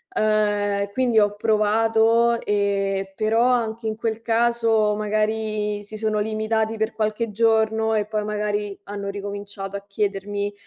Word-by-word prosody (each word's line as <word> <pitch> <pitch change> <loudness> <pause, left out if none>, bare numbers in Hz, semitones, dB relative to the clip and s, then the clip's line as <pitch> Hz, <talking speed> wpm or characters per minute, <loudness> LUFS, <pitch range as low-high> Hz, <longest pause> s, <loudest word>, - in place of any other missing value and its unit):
Uhm, 205 -2 +1
quindi 245 0 +1
ho 205 -1 +2
provato 225 +2 +3
e 195 -2 -1
però, 225 +3 +2
anche 230 -2 0
in 215 - -2
quel 225 0 -3
caso 230 -2 +2
magari 215 0 -1
si 215 +1 -9
sono 215 -1 0
limitati 220 +1 -1
per 220 0 -1
qualche 215 +1 -1
giorno 220 0 +2
e 210 -1 +1
poi 210 0 -2
magari 210 -1 -2
hanno 200 0 -5
ricominciato 200 0 -6
a 200 - -5
chiedermi, 205 0 -2
215 Hz, 135 wpm, -23 LUFS, 205-220 Hz, -, provato